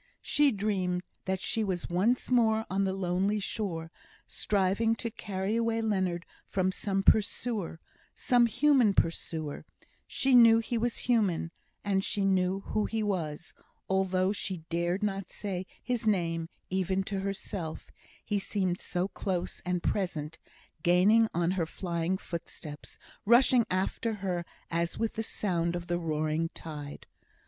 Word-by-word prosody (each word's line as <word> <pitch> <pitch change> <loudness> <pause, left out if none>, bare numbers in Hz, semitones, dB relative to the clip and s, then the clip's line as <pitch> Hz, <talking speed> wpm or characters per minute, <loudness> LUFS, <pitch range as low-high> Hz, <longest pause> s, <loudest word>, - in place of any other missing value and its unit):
She 290 -1 +4
dreamed 190 -4 -1 0.2
that 190 0 -1
she 225 - 0
was 185 -4 -2
once 215 +10 +1
more 220 -3 +3
on 195 +1 +1
the 190 - +1
lonely 190 +2 0
shore, 175 -5 -3 0.3
striving 205 +3 +1
to 230 0 -4
carry 200 +2 -2
Leonard 210 -7 0
away - - -36 0.2
from 185 -1 +1
some 195 0 -1
pursuer 210 -5 +2 0.4
some 245 -2 +4
human 245 -4 +4
pursuer 160 -2 -1 0.4
she 265 0 +1
knew 230 -2 +8
he 230 +1 -2
was 235 +1 0
human, 200 -9 +2 0.3
and 195 -1 +1
she 200 0 0
knew 190 0 +2
who 215 +1 -1
he 225 -1 -1
was, 170 -6 -3 0.3
although 190 0 +2
she 190 -4 -4
dared 175 +4 0
not 195 -2 -2
say 190 -3 -4 0.2
his 240 -3 -1
name 165 -5 +1 0.2
even 190 0 +1
to 195 0 -3
herself, 190 -4 -5 0.3
he 205 -1 0
seemed 190 -3 -1
so 180 +1 -2
close 185 -2 -3
and 180 -1 0
present, 165 -6 -2 0.4
gaining 195 +7 +5
on 170 +1 +1
her 180 -4 0
flying 170 +1 -2
footsteps, 165 -4 -8 0.3
rushing 240 +1 +5
after 195 +4 -1
her 185 -4 -2 0.3
as 170 0 -1
with 225 -1 -1
the 225 - -2
sound 175 -6 -1
of 175 -1 -4
the 175 0 -1
roaring 155 0 0
tide. 145 -3 -7
190 Hz, 140 wpm, -30 LUFS, 175-215 Hz, 0.4 s, knew